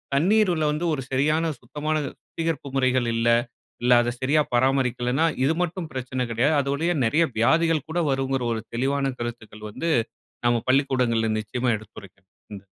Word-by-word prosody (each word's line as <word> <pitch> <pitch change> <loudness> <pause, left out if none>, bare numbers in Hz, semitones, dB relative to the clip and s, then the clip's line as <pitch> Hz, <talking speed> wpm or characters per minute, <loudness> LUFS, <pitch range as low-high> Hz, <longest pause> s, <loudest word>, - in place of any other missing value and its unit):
தண்ணீருல 175 0 +3
வந்து 150 +3 -2
ஒரு 140 - -2
சரியான 155 +5 +1
சுத்தமான 150 +5 -3
சுத்திகரிப்பு 165 -3 -5
முறைகள் 130 -2 +2
இல்ல, 115 +1 0 0.6
இல்ல 125 0 +5
அதை 120 0 -1
சரியா 145 +4 +3
பராமரிக்கலநனா 130 +2 +1 0.2
இது 145 +4 +3
மட்டும் 175 -1 -4
பிரச்சனை 130 -1 -3
கிடையாது, 125 +7 +2
அது 140 - -4
வழியா 170 +4 0
நிறைய 155 +9 +3
வியாதிகள் 160 +6 +2
கூட 175 +2 0
வரும்ங்கிற 135 -1 -1
ஒரு 110 - -3
தெளிவான 135 +2 0
கருத்துக்கள் 110 -3 -7
வந்து, 165 +10 -2 0.6
நம்ம 120 -1 +2
பள்ளிக்கூடங்களில 125 -4 +2
நிச்சயமா 120 +4 -1
எடுத்துரைக்கணும். 95 -2 -15 0.3
ம். 100 - -15
135 Hz, 145 wpm, -24 LUFS, 120-155 Hz, 0.6 s, இல்ல